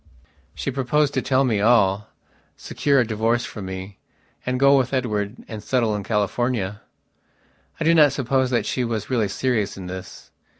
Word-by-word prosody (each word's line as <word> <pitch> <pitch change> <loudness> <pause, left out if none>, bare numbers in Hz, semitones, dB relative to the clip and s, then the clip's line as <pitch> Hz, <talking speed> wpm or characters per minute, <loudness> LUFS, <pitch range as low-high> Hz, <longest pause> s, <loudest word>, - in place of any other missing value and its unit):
She 140 - -3
proposed 140 +3 +1
to 130 - 0
tell 130 +1 +2
me 115 -6 +1
all, 105 -3 +3 0.5
secure 140 -2 +1
a 120 - +3
divorce 115 +2 0
from 105 -3 -7
me, 95 +1 -7 0.5
and 125 0 0
go 140 +1 +6
with 130 0 +1
Edward 105 -4 -1
and 110 -2 -7
settle 115 -5 +1
in 105 - -4
California.... 105 -1 -1 1.0
I - - -1
do 165 +2 +4
not 150 -4 +6
suppose 130 -1 0
that 120 -2 0
she 125 - -1
was 115 -1 -3
really 115 -5 +2
serious 110 -1 -1
in 95 - -7
this. 90 0 -9
120 Hz, 170 wpm, -22 LUFS, 105-130 Hz, 1.0 s, go